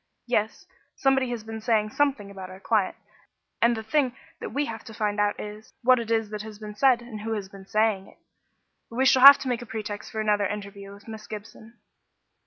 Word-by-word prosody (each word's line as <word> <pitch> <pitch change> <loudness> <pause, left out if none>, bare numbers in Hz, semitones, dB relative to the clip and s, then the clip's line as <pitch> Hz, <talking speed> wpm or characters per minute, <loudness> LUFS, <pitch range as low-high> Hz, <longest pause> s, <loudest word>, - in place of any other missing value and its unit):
Yes; 225 - -1 0.3
somebody 270 -2 +2
has 240 -3 -4
been 220 0 -7
saying 215 -2 +1
something 270 -9 0
about 190 -2 -8
our 185 0 -11
client, 205 -2 +1 0.7
and 235 0 +4
the 220 - -5
thing 255 +2 +1 0.2
that - - -5
we 290 +1 0
have 225 -3 -7
to 220 - -10
find 210 -1 -1
out 205 0 +1
is, 210 +1 -9
what 255 +1 +5
is 230 -1 -5 0.2
it - - -19
that 210 -1 -4
has 215 -1 -9
been 210 0 -8
said 245 +1 +3
and 220 -3 -8
who 225 +1 -3
has 200 -3 -4
been 195 -1 -13
saying 215 -2 +1
it. - - -19 0.7
We 255 +3 0
shall 260 0 +5
have 280 +1 +12
to - - -6
make 245 -2 -1
a 240 - -9
pretext 215 -2 -6
for 220 - -4
another 210 -2 +2
interview 200 -1 -7
with 200 +2 -15
Miss 220 -1 -9
Gibson." 220 +2 -10
220 Hz, 215 wpm, -26 LUFS, 205-240 Hz, 0.7 s, have